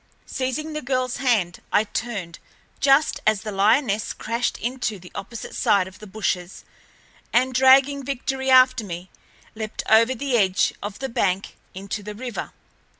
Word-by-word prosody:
Seizing 265 +4 -3
the 305 - -3
girl's 255 -1 -1
hand, 215 -10 +1
I 205 - +4
turned, 205 -5 -5 0.4
just 280 +2 +3
as 215 -2 +3
the 215 - -5
lioness 210 +2 +2
crashed 235 +1 -2
into 240 -3 -3
the 180 -1 -14
opposite 230 +3 -7
side 190 -2 +2
of 190 - -13
the 215 - -11
bushes, 190 -3 -3 0.7
and, 255 +2 +2
dragging 265 +2 +5
Victory 265 0 -3
after 255 -2 +6
me, 180 -1 -7 0.4
leaped 220 -1 -5
over 230 +4 +5
the 265 0 0
edge 190 -2 +2
of 205 0 -6
the 270 0 -4
bank 195 -3 -1 0.2
into 200 +2 -5
the 210 +1 -8
river. 245 +1 -6
230 Hz, 150 wpm, -23 LUFS, 200-260 Hz, 0.7 s, after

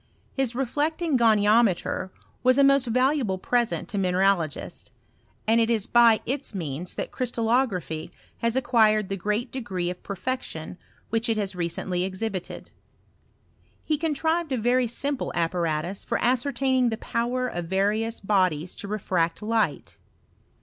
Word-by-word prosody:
His 265 -3 -1
re 270 +2 0
flecting 310 +4 0
goniometer 215 -4 +3 0.3
was 255 +1 +4
a 280 - +6
most 275 -2 +4
valuable 255 -4 +1
present 240 +4 0
to 205 - -2
mineralogists, 185 -4 0 0.6
and 230 +1 +4
it 225 - +1
is 220 -3 +1
by 235 -2 +5
its 265 -3 -3
means 165 0 -4
that - - -4
crystal 240 -3 -2
lography 185 -9 0 0.3
has 230 0 0
acquired 220 -5 +3
the 195 - -1
great 210 +5 -2
degree 190 -9 -3
of 180 - -9
perfection 195 -5 -5 0.3
which 225 +1 0
it 225 - +1
has 200 -2 0
recently 175 +1 -2
exhibited. 190 0 -5 1.1
He 310 - +1
contrived 320 +1 -1
a 260 - +1
very 245 +2 +2
simple 275 +4 -2
apparatus 170 +1 -1
for - - -1
ascertaining 255 0 +1
the 225 - -3
power 245 +3 -1
of 175 -7 -4
various 210 +5 0
bodies 185 -5 +1
to 200 - -6
refract 185 -4 -1
light. 215 -9 -1
225 Hz, 140 wpm, -25 LUFS, 185-255 Hz, 1.1 s, a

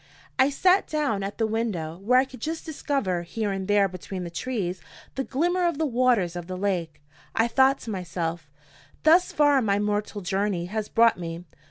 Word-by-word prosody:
I 260 +1 +5
sat 365 +7 +3
down 290 -10 0
at 195 +1 -5
the 225 - +1
window, 210 -8 -2
where 240 +6 +3
I 260 - +5
could 260 -1 -13
just 320 +1 -4
discover, 275 - -1
here 205 +4 -3
and 190 -1 -3
there 205 -1 +4
between 185 0 -7
the 170 - -6
trees, 185 -4 -3 0.3
the 270 - -2
glimmer 350 +7 +1
of 340 -4 -1
the 320 - +1
waters 240 - +2
of 175 -1 -6
the 185 0 -5
lake. 180 -5 -2 0.4
I 225 - +3
thought 265 +3 +4
to 225 - -6
myself: 170 -4 -4 0.5
"Thus 340 +4 +5
far 290 -2 +4
my 200 -3 +1
mortal 210 0 -1
journey 195 -1 -1
has 210 +3 -4
brought 230 -3 +4
me. 170 0 -6
210 Hz, 190 wpm, -25 LUFS, 185-265 Hz, 0.5 s, I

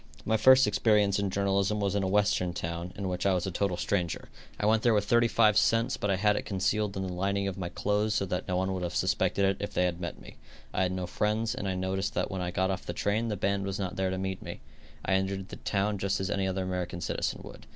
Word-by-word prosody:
My 110 - +2
first 130 +4 +7
experience 105 -1 +3
in 100 -1 0
journalism 100 +1 +1
was 100 -1 0
in 100 - +1
a 95 - 0
Western 95 -2 +2
town, 85 +1 -4
in 100 -1 -3
which 90 -1 -2
I 95 - +3
was 90 - -1
a 95 - -2
total 90 0 -1
stranger. 90 -5 -2 0.3
I - - 0
went 110 +1 +4
there 115 -2 +3
with 105 -1 +1
thirty 120 +2 +4
five 110 -2 +4
cents, 115 +3 +2
but 105 - -2
I 95 - +3
had 105 +2 +2
it - - -1
concealed 100 +1 -1
in 95 - -2
the 90 - -4
lining 100 +2 0
of 95 - -3
my 90 -2 -4
clothes 105 +3 0
so 100 - +1
that 90 0 -3
no 90 - 0
one 95 +1 0
would 95 - -3
have 90 -1 -3
suspected 100 - +1
it 95 0 +1
if 100 - -5
they 90 - +3
had 90 -1 -2
met 85 -9 -5
me. - - -13 0.4
I - - 0
had 90 -1 +1
no 95 -1 -3
friends, 110 +4 0
and 100 - -4
I 95 - -1
noticed 95 +1 -2
that - - -1
when 95 -1 -3
I 90 - -2
got 95 +2 0
off 95 - -3
the 85 - -5
train 105 +6 0
the 105 -2 -2
band 100 +1 0
was 95 0 -3
not 95 -1 -3
there 95 0 0
to 95 - -2
meet 95 0 -3
me. - - -8 0.4
I - - +1
entered 95 0 -1
the - - -8
town 100 0 -1
just 100 +1 0
as 95 -1 -2
any 95 -1 0
other 95 0 -1
American 90 -1 -3
citizen 80 - -2
would. - - -12
95 Hz, 275 wpm, -29 LUFS, 95-105 Hz, 0.4 s, first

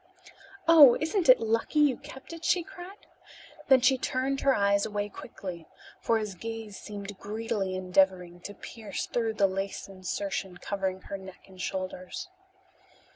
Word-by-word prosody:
"Oh, 300 -7 +9
isn't 320 0 0
it 255 - +9
lucky 225 +6 0
you 295 -4 +5
kept 265 +5 -11
it?" 330 0 -9
she 355 0 +2
cried. 370 +4 -11 0.6
Then 265 -2 +6
she 260 +1 +4
turned 265 +2 -1
her 275 -1 +4
eyes 200 0 +3
away 205 -1 -2
quickly, 175 -4 -8 0.3
for 230 - +2
his 210 -2 -3
gaze 225 +1 -6
seemed 205 -1 -8
greedily 210 -2 -2
endeavoring 185 -1 +1
to 205 - -6
pierce 215 -5 -6
through 225 -2 -1
the 200 - +4
lace 195 +1 -3
insertion 190 -1 -4
covering 190 0 -3
her 200 +1 -6
neck 190 -1 -12
and 185 -1 -11
shoulders. 185 - -4
205 Hz, 150 wpm, -29 LUFS, 190-255 Hz, 0.6 s, Oh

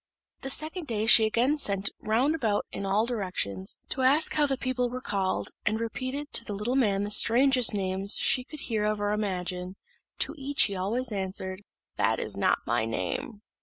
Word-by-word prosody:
The 270 - -5
second 315 +4 -2
day 220 -3 -1
she 225 -1 +7
again 250 +7 +1
sent 200 -6 0
round 245 +8 +1
about 225 -10 -1
in 195 0 -5
all 205 +3 +2
directions, 180 - -3
to 265 - -2
ask 275 +5 +4
how 300 -1 +2
the 270 -1 -1
people 255 -1 -1
were 250 +1 -5
called, 195 -6 -2
and 215 +1 0
repeated 255 +5 -4
to - - +2
the 205 - -5
little 220 +6 -2
man 205 -7 +2
the 205 - -4
strangest 245 +2 +5
names 195 +1 +2
she 265 -2 +2
could 300 +2 -10
hear 220 -3 -2
of 210 0 0
or 205 0 -1
imagine: 185 -3 -3 0.4
to - - 0
each 275 +1 +3
he 200 - 0
answered 185 - -3
always, 235 +5 -1 0.8
"That - - +1
is - - -2
not - - +2
my - - 0
name." 215 -3 -4
225 Hz, 190 wpm, -27 LUFS, 200-260 Hz, 0.8 s, she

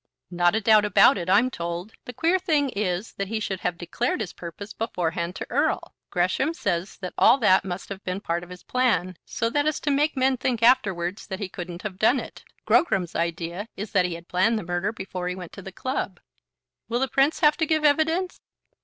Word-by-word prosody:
"Not 175 +2 +2
a 220 - +1
doubt 215 0 +5
about 205 -1 +5
it, 175 +1 -4
I'm 225 +7 +4
told. 170 +2 -5
The - - -6
queer 335 +8 +2
thing 305 -6 +1
is 200 -2 -2
that 200 - -2
he 220 +2 -2
should 190 -3 -3
have 180 -1 -2
declared 175 +10 -2
his 215 -5 -4
purpose 190 +5 -8
beforehand 175 -5 -2
to - - -5
Erle. - - 0 0.2
Gresham 190 - 0
says 185 - -2
that 180 - -5
all - - +7
that 200 -7 +4
must 185 -1 -6
have 200 -1 -7
been 185 +1 -3
part 170 -2 -2
of 175 - -12
his 180 0 -11
plan, 240 -8 +1
so 230 - -1
as 290 +4 0
to 290 - 0
make 295 +1 +1
men 260 0 +2
think 240 -2 -1
afterwards 200 -6 +2
that 190 - -4
he 200 - -4
couldn't 175 0 -7
have 195 -3 -6
done 245 +5 +4
it. - - -9 0.2
Grogram's 190 - +2
idea 170 +4 -2
is 210 +1 -5
that 185 -4 +3
he 175 -2 -2
had 170 +1 -11
planned 205 +6 +2
the 215 - -4
murder 175 +4 -1
before 190 -4 -5
he 180 - -2
went 180 -3 -8
to 200 - -10
the 195 - -9
club." 200 -4 -3 0.7
"Will 235 +1 0
the 265 - +1
Prince 275 +6 +2
have 300 -2 +5
to 320 - 0
give 310 -1 +1
evidence?" 320 +5 +2
200 Hz, 215 wpm, -25 LUFS, 180-255 Hz, 0.7 s, all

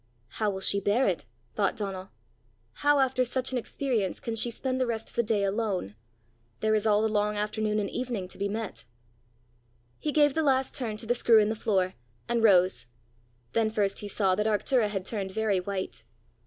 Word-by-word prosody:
"How 215 - -1
will 190 -1 -4
she 200 +1 +2
bear 205 +6 +2
it," 180 -8 -1 0.3
thought 200 -2 0
Donal; 195 -2 -5 0.7
"how 290 0 +4
after 260 -1 +2
such 255 +1 -1
an 255 - 0
experience, 235 -5 -2
can 230 - -4
she 225 +2 +2
spend 260 +2 -2
the 255 - +1
rest 225 -1 -3
of - - -21
the 235 - +3
day 215 -3 0
alone? 195 - -1 0.7
There 215 0 +2
is 215 0 +2
all 210 0 +4
the - - +3
long 210 -1 0
afternoon 210 0 -1
and 205 -1 0
evening 240 -5 -3
to - - -11
be 200 - 0
met!" 200 - -4 1.1
He 300 - -1
gave 290 -2 +4
the 320 - +1
last 265 -3 +2
turn 225 -5 -3
to 225 - -2
the 240 - +2
screw 235 -2 +5
in 210 -1 +4
the - - 0
floor, 195 -4 0 0.3
and 235 -1 +1
rose. 180 - +4 0.6
Then 225 -1 +2
first 205 -2 0
he 205 - -5
saw 195 -2 +1
that 210 +3 0
Arctura 220 +2 +2
had 195 -3 -3
turned 195 -4 -3
very 215 -3 +1
white. 190 +1 -4
215 Hz, 200 wpm, -28 LUFS, 200-235 Hz, 1.1 s, screw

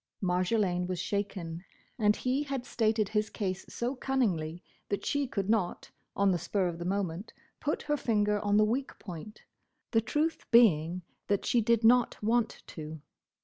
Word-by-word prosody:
Marjolaine 180 0 +1
was 185 -1 -2
shaken, 185 -3 -3 0.4
and 210 -1 +4
he 255 +3 0
had 275 -4 -3
stated 220 -3 +1
his 215 0 0
case 190 -2 -4
so 245 +3 -2
cunningly 185 -12 -1 0.3
that 200 - -2
she 285 -1 0
could 200 -5 -2
not, 210 -5 0 0.2
on 200 -1 +3
the 175 - +1
spur 195 0 0
of 170 -1 -4
the 170 - -4
moment, 190 0 -2 0.3
put 300 0 -1
her 295 0 0
finger 210 -4 +1
on 205 0 +2
the 215 - +6
weak 255 +5 -2
point—the 215 +4 -6
truth 300 +8 -1
being, 180 -7 +5 0.2
that 200 -1 +1
she 240 - +3
did 230 +1 +2
not 240 +1 +5
want 230 +1 +1
to. 155 0 -8
210 Hz, 160 wpm, -30 LUFS, 180-235 Hz, 0.4 s, the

